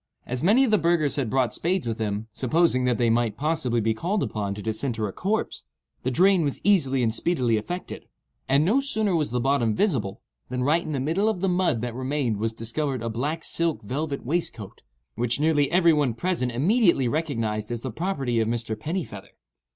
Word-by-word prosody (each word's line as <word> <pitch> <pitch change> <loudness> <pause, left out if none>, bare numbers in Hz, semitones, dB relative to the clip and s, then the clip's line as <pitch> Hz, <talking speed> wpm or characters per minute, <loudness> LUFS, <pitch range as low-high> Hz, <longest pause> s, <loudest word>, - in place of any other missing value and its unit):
As 125 0 -3
many 215 - +4
of 250 - +1
the 215 - +4
burghers 165 -4 +1
had 135 -6 -1
brought 130 -3 +1
spades 180 -1 0
with 115 -1 -3
them, 105 0 -2
supposing 130 +1 +2
that 125 -2 +1
they 115 0 +2
might 115 -2 0
possibly 150 -6 0
be 110 0 +1
called 185 - -1
upon 100 -2 -3
to 105 - -7
disinter 110 0 -2
a 95 - -7
corpse, 210 +3 -2 0.4
the 130 - -1
drain 185 +7 +4
was 145 -3 -1
easily 135 -11 +3
and 110 -1 +1
speedily 125 -5 +1
effected; 175 - -5 0.4
and 140 +3 +4
no 220 +10 +3
sooner 215 -8 +2
was 155 -3 0
the 125 - -1
bottom 120 -4 +1
visible, 120 - 0 0.3
than 125 0 -2
right 155 +5 +3
in 155 - -5
the 140 - -1
middle 165 +11 +1
of 200 -5 -2
the 195 - +1
mud 175 -10 +1
that 120 -1 -3
remained 130 -3 -1
was 110 +2 -1
discovered 115 +3 -3
a 115 - -2
black 150 +8 -3
silk 165 -6 -1
velvet 140 +6 -3
waistcoat, 120 - -3 0.3
which 120 +2 0
nearly 150 -2 +2
every 170 -2 +4
one 140 -6 +1
present 170 -6 -1
immediately 170 - +3
recognized 115 -8 -2
as 120 -1 -4
the 130 - -4
property 135 - -1
of 110 - +1
Mr. 115 -1 -2
Pennifeather. 110 - -6
135 Hz, 200 wpm, -25 LUFS, 115-170 Hz, 0.4 s, many